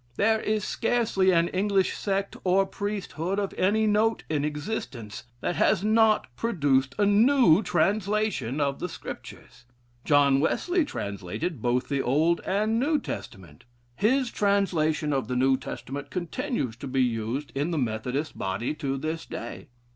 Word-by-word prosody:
There 220 +2 +3
is 215 0 0
scarcely 225 -6 +1
an 170 -2 +4
English 195 0 +1
sect 195 -1 -2
or 190 +1 +3
priesthood 195 -3 -3
of 200 -1 -2
any 210 +4 +2
note 215 +2 +2
in 150 -2 0
existence 145 - -5 0.2
that 175 - -2
has 185 - +3
not 220 0 +4
produced 140 - +1
a 205 - +3
new 210 - +5
translation 200 - 0
of 140 -1 0
the 180 - -3
Scriptures. - - -10 0.4
John 140 -2 +4
Wesley 350 - +1
translated 105 - -4
both 125 +1 0
the 140 -2 0
Old 155 +7 +2
and 215 +4 +1
New 300 +4 +2
Testament. 90 - -8 0.3
His 245 - +2
translation 165 -7 +1
of 135 -5 -1
the 125 - -2
New 130 +1 +3
Testament 140 +1 -6
continues 180 - -3
to 140 - -7
be 130 0 +1
used 120 +4 -2
in 145 +4 -1
the 165 - -1
Methodist 125 +4 -2
body 95 +8 -2
to 135 -3 -3
this 160 +3 -3
day. 120 - -7
170 Hz, 145 wpm, -26 LUFS, 135-210 Hz, 0.4 s, new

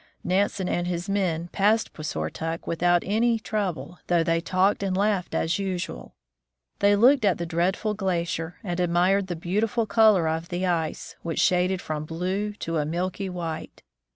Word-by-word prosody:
Nansen 190 +1 0
and 175 0 -1
his 175 +1 -3
men 180 -4 -1
passed 215 +3 +2
Puisortok 155 - -4
without 175 +1 +2
any 230 +4 +2
trouble, 180 -8 -3
though 170 -2 +3
they 165 0 +1
talked 185 +4 +1
and 190 -2 -1
laughed 200 -2 0
as 165 +4 0
usual. 180 - -4 0.6
They 205 0 +5
looked 250 +5 +5
at 195 -4 +3
the 170 - -3
dreaded 185 +5 0
glacier, 170 -3 -2
and 175 -3 -3
admired 180 +3 +2
the 175 - -3
beautiful 210 +7 0
color 215 -7 +4
of 160 +1 -2
the 180 +1 -2
ice, 165 -3 -2
which 165 -1 -3
shaded 180 +1 +2
from 155 -1 -3
blue 185 +6 -2
to 165 -5 -3
a 150 - +1
milky 180 +5 -2
white. 170 -3 -6
180 Hz, 160 wpm, -25 LUFS, 165-200 Hz, 0.6 s, They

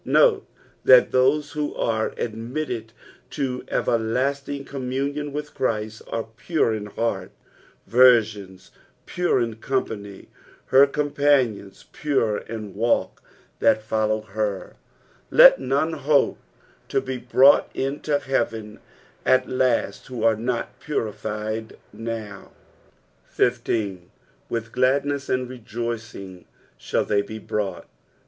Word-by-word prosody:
Note 445 -5 +3 0.4
that - - +7
those 140 +3 +2
who 150 -1 -3
are 110 -1 -1
admitted 115 +1 -4 0.4
to 130 -3 -3
everlasting 135 +5 -1
com' 130 -2 -5
muDJOQ 140 +3 -2
with 150 +1 -5
Christ, 110 -3 -2
are 115 - -3
pure 155 -9 +1
in 105 -1 -4
heart 105 -3 -2 0.3
— - - -32
virgiju, 110 -6 +4 0.5
pure 175 -6 +1
ia 115 -1 -3
company 110 -5 -4 0.2
— - - -28
''her 135 +2 +7
eom 145 +1 -2
panioiit," 130 -10 +1
pure 130 -8 0
in 110 -3 -7
walk~ 115 +4 0 0.4
"(Aa( - - +5
jWfcie 110 0 -1 0.5
Aw." - - -24 0.5
Let - - +8
none 140 +5 0
hope 145 -1 +2 0.5
to - - +1
bo 130 -1 -5
brought 130 +3 +5
iuto 145 +2 -1
" - - -18
heaven 115 -5 -2 0.4
at 130 0 +3
last 130 -2 0
who 125 -4 -5
are 115 -1 +4
not 120 +2 -3
puriQed 110 -4 -4 0.2
now. 110 -3 -7 0.8
19. 110 -7 0 0.2
'' - - -36
With 115 -1 -3
gladnea 140 +2 +1
and 130 0 0
rejoiring 115 -6 -6 0.3
iJiall - - -1
they 100 -1 +2
be 105 +2 -7
brought." 100 -4 -4
120 Hz, 120 wpm, -23 LUFS, 110-140 Hz, 0.8 s, Let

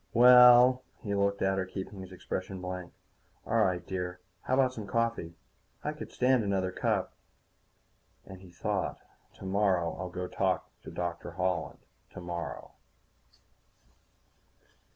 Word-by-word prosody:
"Well." 125 +1 +8 0.2
He 100 - -2
looked 100 0 +1
at 95 0 +1
her, 95 - -1
keeping 95 +1 -7
his 95 0 -10
expression 95 +1 -5
blank. 90 -1 -6 0.5
"All 115 0 +2
right, 90 -2 0
dear. 90 -1 -4 0.2
How 130 - 0
about 130 -1 +3
some 110 -5 -7
coffee? 115 -7 -1 0.5
I - - -1
could - - -9
stand 125 -2 +2
another 95 -2 0
cup." - - -1 1.1
And 95 -1 -11
he 95 - -14
thought: 85 - -2 0.4
_Tomorrow 95 -3 0
I'll 90 0 -4
go. 90 +1 -5
I'll 95 0 0 0.3
talk 85 -1 -3
to - - -8
Holland 90 -2 -2 0.2
tomorrow. 85 -1 -6
95 Hz, 130 wpm, -30 LUFS, 90-110 Hz, 1.1 s, Well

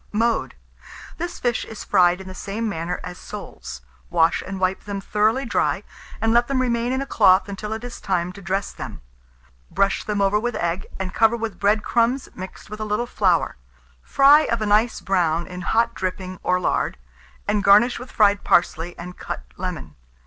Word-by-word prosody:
Mode. 230 +2 0 0.6
This 345 +1 -4
fish 240 -2 0
is 220 - -8
fried 180 -2 +4
in 190 - -9
the 185 - -7
same 210 +4 -4
manner 175 -3 -3
as 180 0 -7
soles. 210 - -8 0.3
Wash 165 -1 +3
and 195 0 -6
wipe 185 0 0
them 200 -1 -4
thoroughly 215 +7 +1
dry, - - 0 0.4
and 225 0 +2
let 240 0 +4
them 275 -2 0
remain 240 -1 0
in 260 +1 0
a - - -7
cloth 195 -7 +4
until 205 +2 -6
it 220 +1 -4
is 245 -1 -8
time 180 -2 -1
to 200 - -11
dress 195 +2 -2
them. - - -8 0.7
Brush 195 0 +1
them 210 -1 -2
over 200 +1 +3
with 240 +1 -2
egg, 170 +2 -2
and 190 -1 -4
cover 225 +1 +3
with 225 -2 -5
bread 210 +1 +2
crumbs 240 +3 +1
mixed 185 +1 -9
with 215 +1 -8
a - - -2
little 215 +3 -1
flour. 185 - +1 0.4
Fry 280 - +6
of 235 - 0
a 215 - -1
nice 215 +3 +2
brown 170 -3 +1
in 180 0 -8
hot 230 +5 +1
dripping 185 -1 -4
or 180 0 +1
lard, 175 - 0 0.5
and 205 0 +1
garnish 210 +4 +5
with 250 - -9
fried 205 -1 +3
parsley 170 0 +1
and 180 +1 -9
cut - - -5
lemon. 175 - -5
205 Hz, 190 wpm, -23 LUFS, 185-230 Hz, 0.7 s, Fry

